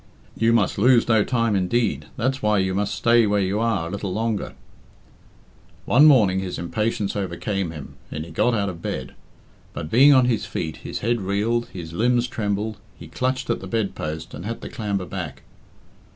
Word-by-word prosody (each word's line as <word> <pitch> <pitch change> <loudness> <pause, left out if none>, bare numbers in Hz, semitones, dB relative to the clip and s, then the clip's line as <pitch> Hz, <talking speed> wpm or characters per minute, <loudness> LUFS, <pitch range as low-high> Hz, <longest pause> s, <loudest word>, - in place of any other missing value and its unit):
"You 115 0 +2
must 110 -4 +2
lose 120 +2 +5
no 110 -3 +4
time 115 -3 +1
indeed, 95 - 0
that's 130 +3 -1
why 105 -1 +2
you 95 -1 +1
must 100 +1 -1
stay 115 -1 +4
where 105 0 +2
you 100 +2 0
are 110 -7 0
a - - -7
little 100 -1 -4
longer." 110 +1 -2 1.3
One 140 +5 +6
morning 105 -10 +5
his 95 -2 -4
impatience 105 +3 -2
overcame 95 0 -2
him, 75 -4 -9
and 75 +1 -5
he 85 - -11
got 115 +9 +2
out 100 -2 0
of 85 -3 -6
bed. - - -4 0.6
But, 75 - -6
being 135 +5 +7
on 130 -3 +6
his 120 -3 0
feet, 80 - -4
his - - -6
head 120 0 0
reeled, 105 +5 0
his 85 -3 -8
limbs 120 +5 +2
trembled, 105 -1 -2 0.2
he - - -11
clutched 130 -1 -1
at - - -1
the 95 - -8
bed 100 -1 -1
post, 80 +1 -5
and - - -7
had 115 +3 -4
to - - -6
clamber 100 -5 -3
back. 85 -6 -6
105 Hz, 190 wpm, -23 LUFS, 95-115 Hz, 1.3 s, being